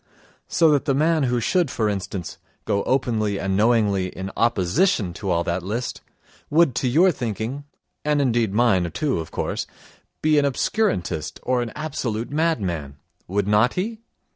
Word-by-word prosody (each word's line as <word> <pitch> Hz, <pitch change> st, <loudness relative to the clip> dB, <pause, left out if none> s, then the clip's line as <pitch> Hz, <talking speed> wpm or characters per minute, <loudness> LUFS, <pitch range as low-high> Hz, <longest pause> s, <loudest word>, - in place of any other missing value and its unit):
So 160 Hz, -1 st, +4 dB
that 145 Hz, -3 st, +2 dB
the 135 Hz, -, +1 dB
man 155 Hz, 0 st, +2 dB
who 120 Hz, 0 st, +1 dB
should, 175 Hz, -, +1 dB
for 110 Hz, -4 st, 0 dB
instance, 95 Hz, -3 st, -4 dB, 0.3 s
go 100 Hz, -, +1 dB
openly 110 Hz, -6 st, 0 dB
and 95 Hz, -1 st, -1 dB
knowingly 105 Hz, -3 st, +2 dB
in 95 Hz, +1 st, -6 dB
opposition 115 Hz, -, +1 dB
to 95 Hz, +2 st, -5 dB
all 85 Hz, -1 st, +2 dB
that 85 Hz, +2 st, -1 dB
list 110 Hz, +7 st, -4 dB, 0.5 s
would 160 Hz, -3 st, +4 dB
to 130 Hz, -, +1 dB
your 170 Hz, +9 st, +5 dB
thinking, 120 Hz, -, -4 dB, 0.4 s
and 150 Hz, -1 st, +1 dB
indeed 120 Hz, -6 st, +1 dB
mine, 100 Hz, -6 st, +2 dB
too, 145 Hz, -, 0 dB
of 80 Hz, -, -6 dB
course, -, -, -3 dB, 0.6 s
be 155 Hz, -1 st, +4 dB
an 145 Hz, -, +2 dB
obscurantist 95 Hz, -, -1 dB
or 125 Hz, -1 st, +1 dB
an 120 Hz, -2 st, -4 dB
absolute 135 Hz, -7 st, -3 dB
madman: 95 Hz, -, -1 dB, 0.3 s
would 100 Hz, +2 st, -1 dB
not 105 Hz, +4 st, +3 dB
he? 220 Hz, +5 st, -2 dB
115 Hz, 160 wpm, -23 LUFS, 95-145 Hz, 0.6 s, your